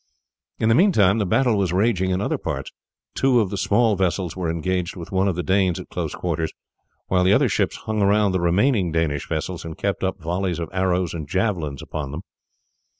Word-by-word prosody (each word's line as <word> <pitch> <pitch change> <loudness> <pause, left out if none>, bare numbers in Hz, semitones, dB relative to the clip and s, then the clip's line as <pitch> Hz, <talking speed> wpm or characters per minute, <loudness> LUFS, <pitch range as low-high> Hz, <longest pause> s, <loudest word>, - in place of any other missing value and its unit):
In 110 - 0
the 115 - +5
meantime 115 - +4
the 100 - 0
battle 120 0 +2
was 95 -4 0
raging 95 -1 +1
in 95 +1 0
other - - -1
parts. - - -4 0.4
Two 130 -2 +3
of 105 -4 0
the - - -2
small 100 +3 +2
vessels 90 -2 -1
were 90 -3 -2
engaged 90 +2 -2
with 85 -3 -9
one 95 +1 +2
of 95 - 0
the 90 - -2
Danes 95 0 +1
at - - -10
close - - -4
quarters, 80 -2 -2 0.5
while 90 -1 +2
the 95 +2 +4
other 135 +4 +4
ships 100 -3 0
hung 110 -1 -3
around 100 0 +3
the 95 - 0
remaining 95 +2 +2
Danish 80 -3 -1
vessels 80 +2 -3
and 80 -1 -7
kept 100 -1 -2
up 95 +1 -1
volleys 90 +1 -2
of 85 -1 -4
arrows 95 -2 0
and 80 -4 -6
javelins 90 -8 -1
upon 75 -3 -5
them. 75 +5 -6
95 Hz, 210 wpm, -22 LUFS, 85-100 Hz, 0.5 s, the